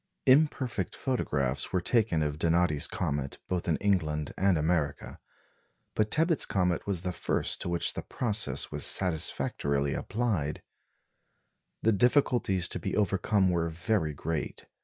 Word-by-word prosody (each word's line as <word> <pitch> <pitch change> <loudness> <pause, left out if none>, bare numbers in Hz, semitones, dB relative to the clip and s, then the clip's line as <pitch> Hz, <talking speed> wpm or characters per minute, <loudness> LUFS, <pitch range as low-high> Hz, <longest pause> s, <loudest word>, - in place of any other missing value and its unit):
Imperfect 130 - +2
photographs 70 - -1
were 90 - +1
taken 95 -5 +1
of 75 0 -3
Donati's 85 -3 +2
comet 70 -1 -3
both 90 -2 -2
in 80 - +2
England 75 -7 0
and 95 -3 +2
America; 75 -2 -1 0.7
but 110 0 +1
Tebbutt's 160 +2 +2
comet 90 -2 0
was 95 -4 -2
the 90 - -1
first - - -1
to - - -3
which 85 -1 +1
the - - -4
process 110 -4 -2
was - - -4
satisfactorily 70 -5 0
applied. 100 -10 -2 1.2
The 115 - +4
difficulties 115 -5 +2
to - - -4
be - - -3
overcome 100 -1 +2
were 85 -1 0
very 80 -2 -1
great. 80 +1 -4
90 Hz, 135 wpm, -29 LUFS, 75-105 Hz, 1.2 s, The